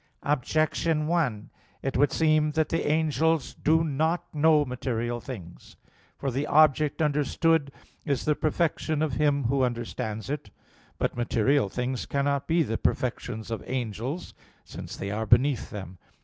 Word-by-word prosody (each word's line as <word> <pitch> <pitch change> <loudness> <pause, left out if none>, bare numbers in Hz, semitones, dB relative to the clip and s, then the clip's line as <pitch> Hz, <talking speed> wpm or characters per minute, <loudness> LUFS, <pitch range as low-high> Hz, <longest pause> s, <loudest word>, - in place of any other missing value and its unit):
Objection 155 +2 +1
1: 150 -11 -1 0.3
It 135 - -2
would 145 +2 +3
seem 155 -1 +2
that 160 -1 +1
the 165 - -1
angels 160 -1 +1
do 160 +2 +2
not 160 +3 0
know 155 0 +4
material 120 -2 -3
things. 95 -11 -10 0.4
For 135 - -2
the 140 +4 -2
object 155 0 +4
understood 150 +1 +1 0.3
is 140 -4 -1
the 150 - +3
perfection 155 0 0
of 155 -4 -1
him 145 -2 +2
who 135 +3 +1
understands 115 -3 -3
it. 140 -6 -4 0.5
But - - -1
material 120 0 +2
things 125 +3 -3
cannot 140 0 0
be 165 0 +3
the 115 -5 -3
perfections 110 -3 -2
of 115 - -3
angels, 125 - -4 0.3
since - - -8
they 100 +1 -4
are 110 +2 -2
beneath 120 +1 +3
them. 95 -4 -8
140 Hz, 145 wpm, -27 LUFS, 120-155 Hz, 0.5 s, know